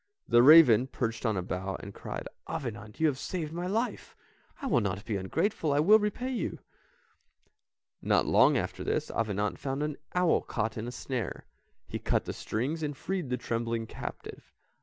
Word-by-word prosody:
The 120 0 +6
raven 130 -4 +8
perched 115 -2 -2
on 110 -3 0
a 90 - -1
bough 95 +2 -3
and 100 - -9
cried. - - -6 0.2
"Avenant 110 -9 -6
you 160 - +3
have 140 -4 +1
saved 165 -3 -4
my 175 +1 -3
life, 225 +6 -2 0.4
I 280 - -6
will 235 - +3
not 100 0 -3
be 110 - -2
ungrateful, 150 - 0
I 140 - +3
will 210 +8 +7
repay 215 +5 -2
you." 235 -8 -2 1.4
Not - - +2
long - - +5
after - - -3
this, - - -1
Avenant 105 -4 -1
found 135 +1 -2
an 150 -1 -3 0.2
owl 180 -2 +3
caught 110 0 -2
in 110 +1 -4
a - - -4
snare, 125 -1 -4 0.4
he - - -4
cut - - 0
the - - -4
strings, 140 +9 -3
and 145 -3 -3
freed 185 -5 -3
the 125 - 0
trembling 115 -1 -2
captive. - - -8
125 Hz, 180 wpm, -29 LUFS, 110-165 Hz, 1.4 s, raven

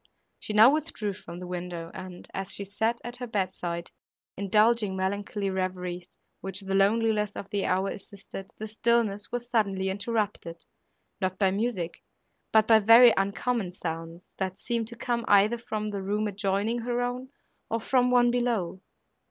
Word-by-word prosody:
She 215 - -5
now 220 +6 +8
withdrew 290 -10 -2
from 175 -3 -10
the 180 - -7
window, 175 -2 -5
and, 185 -1 -9
as 195 0 -3
she 200 - -3
sat 220 +4 -1
at 240 +1 -6
her 245 0 -5
bedside, 185 -5 -3 0.4
indulging 210 +1 +3
melancholy 200 +1 -2
reveries, 180 -1 -3 0.3
which 195 0 -4
the 195 0 -4
loneliness 210 +1 +2
of 200 - -7
the 200 -1 0
hour 190 +2 +1
assisted, 195 -1 -9
the 215 - -5
stillness 220 -2 +1
was 245 0 -3
suddenly 200 -5 +1
interrupted 205 -5 -3 0.6
not 185 0 -1
by 190 -1 +3
music, 195 -4 -2 0.5
but 220 -1 +5
by 225 -1 +7
very 230 +2 +8
uncommon 200 +1 -1
sounds, 165 0 -6
that 190 0 -3
seemed 235 -2 -2
to 235 - -7
come 235 0 -2
either 205 +4 +4
from 215 -2 -3
the 200 -1 -3
room 210 +2 -1
adjoining 205 +3 -1
her 240 +1 -1
own, 250 +1 -4 0.4
or 230 - 0
from 250 +2 +2
one 245 -1 +4
below. 230 -7 -1
205 Hz, 160 wpm, -27 LUFS, 190-230 Hz, 0.6 s, now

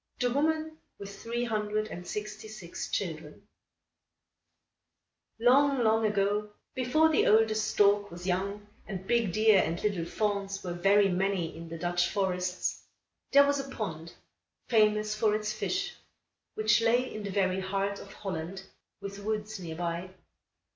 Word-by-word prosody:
THE 245 -1 +1
WOMAN 315 +2 0 0.2
WITH 200 0 -9
THREE 235 +1 -2
HUNDRED 215 -2 -1
AND 180 -2 -8
SIXTY 210 +1 -5
SIX 200 -6 -7
CHILDREN 165 +1 -4 1.9
Long, 265 +2 +4
long 220 0 +3
ago, 210 +1 0 0.2
before 260 +5 +3
the 315 - +3
oldest 215 0 +4
stork 205 -1 +3
was 175 +1 -9
young 200 +3 -2 0.2
and 190 -2 -6
big 235 -3 +2
deer 215 +1 +5
and 165 +1 -2
little 195 -6 0
fawns 200 0 -2
were 180 -2 -3
very 195 +3 +4
many 185 -2 -1
in 165 0 -9
the 165 - -6
Dutch 175 +1 0
forests, 185 -2 -1 0.5
there 280 0 +7
was 285 0 +1
a 275 0 -5
pond, 170 -10 -5 0.5
famous 215 -2 +3
for 215 0 +2
its 215 0 -2
fish, 390 - -2 0.6
which 215 +1 +3
lay 240 +3 +2
in 215 - -5
the 205 - -5
very 190 -1 +1
heart 195 +1 -2
of 200 - -11
Holland, 190 -1 -5 0.4
with 200 0 -7
woods 215 0 -3
near 165 -3 -6
by. 170 +1 -3
205 Hz, 145 wpm, -29 LUFS, 185-220 Hz, 1.9 s, there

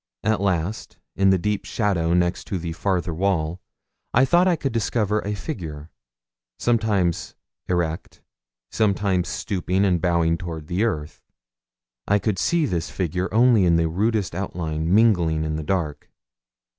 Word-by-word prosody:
At 110 -2 +1
last, 95 +1 -2 0.2
in 95 0 +3
the 95 - +4
deep 105 +3 -1
shadow 90 -6 0
next 90 0 0
the 85 -3 -3
farther 90 -1 -1
wall, 85 -1 -1 0.5
I 130 +3 +6
thought 175 +7 +4
I 180 - +3
could 135 -5 -3
discover 110 -2 0
a 105 0 -3
figure, 80 - -6 0.7
sometimes 105 -8 0 0.3
erect, 85 -2 -2 0.5
sometimes 100 -4 +1
stooping 95 0 -1
and 90 -4 +2
bowing 85 -2 +2
toward 85 -4 -6
the 90 +8 0
earth. 75 -9 -3 0.9
I 100 - +4
could 105 -2 -1
see 170 -2 +2
this 85 - -2
figure 90 0 -2
only 115 -1 +5
in 85 -2 +4
the 85 0 +2
rudest 105 +3 0
outline 85 -3 -3
mingling 90 -7 +3
with 75 0 -2
the 80 - -3
dark. 75 -4 -2
90 Hz, 145 wpm, -23 LUFS, 85-105 Hz, 0.9 s, I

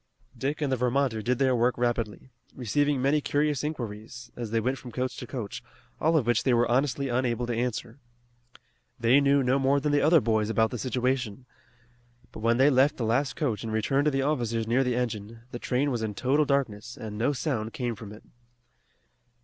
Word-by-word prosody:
Dick 145 +3 -3
and 140 - 0
the - - +3
Vermonter 125 -2 +1
did 125 +3 0
their 130 -1 +2
work 120 +1 +2
rapidly, 120 0 -2 0.2
receiving 140 +4 +1
many 145 +2 +3
curious 145 -1 0
inquiries, 120 -4 -6
as 120 -2 -5
they 115 +1 +1
went 130 +4 -1
from 125 - -10
coach 130 +2 -2
to - - -7
coach, 120 -7 -5 0.4
all 160 +1 +3
of 135 - +1
which 120 0 +2
they 130 -3 +2
were 120 +1 +3
honestly 135 +2 +1
unable 120 -1 0
to 120 - -2
answer. 120 +1 -3 1.0
They 120 +4 +5
knew 140 0 +3
no 130 +2 +2
more 135 +1 +3
than 150 +1 -1
the 145 - +3
other 160 +2 +6
boys 110 -3 0
about 110 0 +2
the 125 - -4
situation. 125 -2 -1 0.9
But - - -9
when 115 +2 +2
they 135 +3 +5
left 135 +3 +3
the 120 - -2
last 130 +5 +1
coach 120 - -1
and 110 - -4
returned 135 +6 +1
to 150 - +3
the 135 -1 0
officers 120 -6 0
near 120 +4 +2
the 125 -2 0
engine, 115 -2 -3
the 120 - -6
train 135 +4 0
was 120 -3 -2
in 110 -2 -3
total 140 +6 +2
darkness, 120 -5 -1
and 110 -4 -7
no 115 +7 +1
sound 125 -6 -2
came 120 -1 -3
from 110 -2 -10
it. 105 - -12
125 Hz, 205 wpm, -27 LUFS, 115-140 Hz, 1.0 s, other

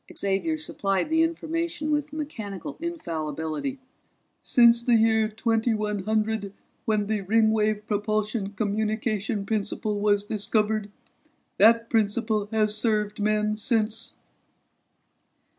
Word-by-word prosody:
Xavier 200 +12 0
supplied 200 -5 -1
the 320 0 +4
information 325 -1 -1
with 295 0 0
mechanical 280 -6 -6
infallibility. 165 - -4 0.6
"Since 235 -1 +5
the 235 0 +3
year 220 -1 +3
2100 215 -2 0 0.3
when 215 -2 +1
the 215 0 -1
Ringwave 215 +1 +2
propulsion 210 0 -1
communication 215 0 -1
principle 210 0 -2
was 205 -1 +2
discovered. 210 0 0 0.7
That 230 +2 +6
principle 215 -1 +1
has 215 -1 +2
served 210 -2 0
men 215 0 +1
since." 225 +1 -1
215 Hz, 95 wpm, -26 LUFS, 205-230 Hz, 0.7 s, That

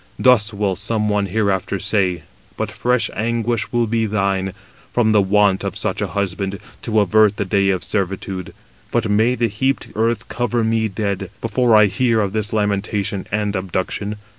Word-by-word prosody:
Thus 120 -4 +4
will 100 -2 -1
some 105 +2 -1
one 105 -1 +1
hereafter 100 -1 0
say; 90 -4 0 0.3
but - - -2
fresh 125 -3 0
anguish 115 +1 -1
will 120 -1 +2
be 115 0 0
thine, 95 -2 0 0.4
from 115 -3 +2
the 105 -1 +5
want 100 0 +3
of - - -3
such - - -1
a - - 0
husband, 100 0 -2 0.2
to 110 -2 +1
avert 105 +1 +4
the 100 - -1
day 100 +1 +2
of 95 -2 0
servitude. 95 -2 -2 0.4
But 120 -2 0
may 110 +4 +3
the 120 -1 +1
heaped 130 +6 -1
earth 115 -1 0
cover 120 -1 -1
me 110 0 +1
dead, 100 -2 -3
before 115 +1 +2
I 105 0 +7
hear 115 +3 +1
of 100 -2 -1
this 110 -2 -2
lamentation 100 -2 -1
and 105 0 -1
abduction." 95 +2 -3
105 Hz, 170 wpm, -20 LUFS, 100-110 Hz, 0.4 s, I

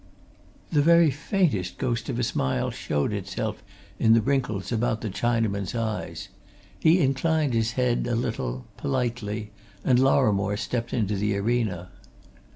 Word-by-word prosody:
The 150 -3 +4
very 170 0 +5
faintest 145 - 0
ghost 120 -4 -2
of 120 - -2
a 125 - 0
smile 65 - 0
showed 75 +8 -1
itself 105 +2 -4 0.4
in 110 -1 +5
the 115 - +4
wrinkles 125 -6 -1
about 115 -1 0
the 110 - -3
Chinaman's 110 -2 -1
eyes. 110 -2 -3 0.5
He 165 +3 +5
inclined 145 +1 +1
his 115 0 +1
head 125 -1 +1
a 120 - 0
little, 65 - -3
politely, 115 -5 -2 0.3
and 125 -1 +4
Lorrimore 105 -7 +3
stepped 115 +1 -3
into 105 -4 0
the 100 0 0
arena. 100 -5 -1
115 Hz, 140 wpm, -26 LUFS, 105-130 Hz, 0.5 s, very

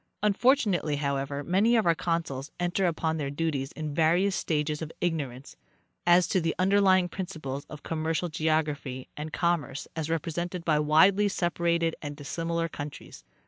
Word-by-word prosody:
Unfortunately, 210 - +2
however, 140 0 -2
many 200 +8 +3
of 225 - +3
our 170 - +5
consuls 160 -5 -2
enter 175 +2 +1
upon 160 -1 -1
their 145 -3 -2
duties 145 -2 -2
in 155 -2 -5
various 175 +6 +3
stages 150 -1 -1
of 160 0 -5
igno 160 -6 0
rance 125 - -12 0.5
as 175 0 +6
to 185 - +1
the 165 0 -1
underlying 185 -1 +4
principles 160 -7 -5
of 150 -2 -10
commercial 160 +2 -1
geography 155 -5 -1
and 155 +1 -6
commerce 170 -6 -1
as 160 -1 -3
represented 170 +2 -3
by 155 -2 +3
widely 185 +7 +5
separated 170 -3 0
and 145 -1 -5
dissimilar 165 +3 -2
countries. 145 -2 -8
165 Hz, 150 wpm, -28 LUFS, 150-175 Hz, 0.5 s, as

